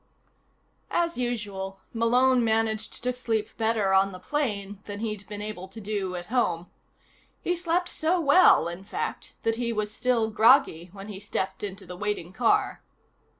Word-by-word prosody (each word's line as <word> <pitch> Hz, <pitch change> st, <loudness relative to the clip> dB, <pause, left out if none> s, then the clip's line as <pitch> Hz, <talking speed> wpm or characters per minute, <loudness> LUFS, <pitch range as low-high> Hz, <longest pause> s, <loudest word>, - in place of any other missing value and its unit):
As 340 Hz, -1 st, 0 dB
usual, 200 Hz, -6 st, -3 dB
Malone 245 Hz, +2 st, +4 dB
managed 220 Hz, -1 st, 0 dB
to 250 Hz, 0 st, 0 dB
sleep 230 Hz, -4 st, -2 dB
better 220 Hz, -4 st, +1 dB
on 195 Hz, +1 st, +4 dB
the 185 Hz, -, -8 dB
plane 205 Hz, -4 st, -2 dB
than 205 Hz, -1 st, -6 dB
he'd 215 Hz, -3 st, -4 dB
been 205 Hz, 0 st, -6 dB
able 210 Hz, -3 st, -6 dB
to 195 Hz, +4 st, -10 dB
do 200 Hz, -3 st, -3 dB
at 175 Hz, 0 st, -5 dB
home. 180 Hz, -9 st, 0 dB, 0.7 s
He 355 Hz, -, +1 dB
slept 350 Hz, +1 st, 0 dB
so 345 Hz, +1 st, 0 dB
well, 295 Hz, -, +6 dB
in 175 Hz, +2 st, -6 dB
fact, 195 Hz, -, -5 dB
that 225 Hz, 0 st, +1 dB
he 235 Hz, -1 st, -1 dB
was 210 Hz, -1 st, -2 dB
still 230 Hz, -2 st, +1 dB
groggy 220 Hz, -, +4 dB
when 195 Hz, +1 st, -10 dB
he 195 Hz, -2 st, -7 dB
stepped 190 Hz, -1 st, -3 dB
into 195 Hz, -1 st, -5 dB
the 180 Hz, 0 st, -8 dB
waiting 195 Hz, -3 st, -3 dB
car. 235 Hz, +2 st, +2 dB
215 Hz, 160 wpm, -27 LUFS, 195-245 Hz, 0.7 s, well